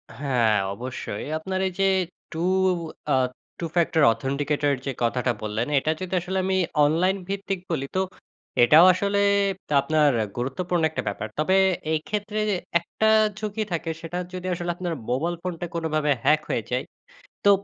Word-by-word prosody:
হ্যাঁ, 120 -5 +2 0.2
অবশ্যই। 120 -2 -5
আপনার 190 +4 -3
এই - - -3
যে 195 - +4 0.5
টু 165 +1 -3 0.7
আ - - +5 0.5
Two-factor 165 -1 +1
authenticator 145 +3 0
যে 135 - -1
কথাটা 125 +1 +1
বললেন, 110 +3 -2
এটা 155 - 0
যদি 185 0 -5
আসলে 190 +1 -3
আমি 190 0 +1 0.3
অনলাইন 175 +6 +2
ভিত্তিক 195 -1 -3
বলি 140 -4 -1
তো, 190 - +3 0.6
এটাও 155 +8 +8
আসলে 200 +2 0 0.6
আপনার 150 0 +3 0.3
গুরুত্বপূর্ণ 170 +8 -1
একটা 155 - -3
ব্যাপার। 105 +2 -3
তবে 185 +5 +3 0.4
এই 155 - +2
ক্ষেত্রে 210 0 -2 0.4
একটা 220 +5 0 0.3
ঝুঁকি 215 0 -2
থাকে, 165 0 -2
সেটা 170 +1 -5 0.2
যদি 185 0 -6
আসলে 175 0 -2
আপনার 175 -1 -3 0.2
মোবাইল 160 +8 0
ফোনটা 175 -1 -4
কোনোভাবে 155 -3 0
হ্যাক 155 0 +4
হয়ে 115 - 0
যায়, 125 +1 0 0.6
তো 200 - +7
165 Hz, 145 wpm, -25 LUFS, 140-185 Hz, 0.7 s, এটাও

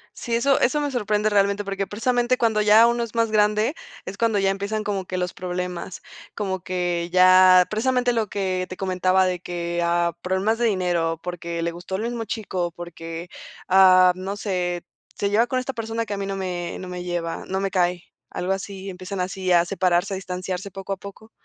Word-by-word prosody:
Sí, 235 - -3
eso 270 +4 +3
eso 295 +5 +2
me 290 -1 -1
sorprende 210 -3 0
realmente 200 0 +2
porque, 195 0 -3
precisamente 245 +3 +1
cuando 220 -2 +2
ya 215 +2 +7
uno 235 0 +1
es 235 -1 -8
más 230 -1 +1
grande, 210 +3 +2 0.3
es 190 - -6
cuando 225 0 +1
ya 195 -1 +2
empiezan 200 +2 -3
como 200 -2 -2
que 185 - -4
los 180 0 -2
problemas, 180 0 -5 0.3
como 190 -2 -2
que 175 -1 -2
ya, 185 0 +7
precisamente 245 +2 +1
lo 225 -2 0
que 185 -2 -2
te 185 - -7
comentaba 185 0 +2
de 180 -1 -1
que, 175 -1 -3
ah, 170 0 +1
problemas 190 +5 0
de 240 - +2
dinero, 175 -6 0
porque, 170 -1 -4
le 170 - -1
gustó 175 +2 -6
el 205 - -2
mismo 235 -1 -3
chico 195 -4 -3
o - - -9
porque, 165 0 -8 0.4
ah, 185 -1 +7
no 190 +2 -5
sé, 180 -4 -2 0.3
se 200 0 -1
lleva 225 +3 +3
con 255 - -1
esta 265 +1 -4
persona 230 0 -3
que 205 - -4
a - - -3
mí 195 0 -3
no 195 - -3
me 180 -2 -4
no 185 - -7
me 180 0 -6
lleva, 175 -2 -3
no 190 +1 -2
me 195 0 -1
cae, 180 -2 +1 0.3
algo 180 +2 -3
así. 195 0 -4
Empiezan 185 +1 -6
así 185 0 -2
a 170 -1 +5
separarse, 180 +1 +1
a - - -1
distanciarse 185 +1 -5
poco 195 +1 -5
a - - -6
poco. 200 +3 -12
190 Hz, 205 wpm, -23 LUFS, 180-210 Hz, 0.4 s, ya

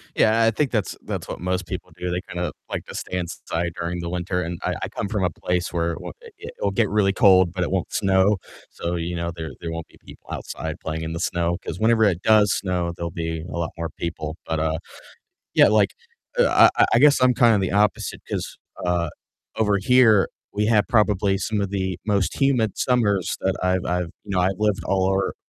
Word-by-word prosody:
Yeah, 110 +1 +4
I 115 - +4
think 135 +5 0
that's 105 -6 -1
that's - - -4
what - - -6
most 90 +1 -2
people - - -6
do, 90 - -3
they 90 +1 -1
kinda 90 0 -2 0.2
like - - -4
to - - -10
stay 90 - -4
inside 85 -1 -3
during 85 +1 -3
the 85 0 -4
winter 90 +1 -2
and 85 0 -5
I - - -1
I - - -1
come - - -4
from 100 -1 -1
a 90 - +2
place 90 +2 -2
where 85 -1 0
w - - -7
it 460 0 -11
it'll - - 0
get - - +1
really 100 -2 +2
cold, 95 -5 +5
but 90 -1 -2
it - - -3
won't 95 -2 -1
snow, 95 +1 +3 0.3
so, 85 +1 -4
you 85 +1 -3
know, 85 0 -2
there 80 -1 -6
there 85 - -5
won't 80 0 -5
be - - -21
people - - -15
outside - - -5
playing 80 0 -4
in 80 0 -4
the 85 - -4
snow, 85 -1 0
'cause - - -5
whenever 110 +1 +4
it 95 -4 +2
does 105 -1 +5
snow, 90 -3 -1
there'll 85 0 -4
be 80 -1 -3
a - - -4
lot 85 -1 -2
more 85 -1 -3
people, 80 -2 -4
but, 80 -1 -2
uh, 80 0 0 0.8
yeah, - - +7
like, 105 -1 +3 0.5
uh, - - +6
I - - +5
I - - +6
guess 145 +2 +5
I'm 125 0 +4
kinda 115 -3 +5
the 95 -1 -1
opposite, 105 +1 +1
'cause, - - -4 0.3
uh, 85 -2 0 0.5
over 105 -2 +2
here 110 -1 +5 0.3
we 105 +1 +1
have 110 -1 +4
probably 105 -4 +2
some 105 +2 -1
of 100 - -1
the 95 -2 -2
most 100 -3 0
humid 125 -7 +2
summers 105 -8 +1
that 95 0 +1
I've 90 0 +1
I've 90 -1 -1
you 105 - -10
know, 90 - +2
I've 95 +1 +1
lived 105 -3 +1
all 95 -1 +1
over 95 0 0
95 Hz, 220 wpm, -23 LUFS, 85-105 Hz, 0.8 s, yeah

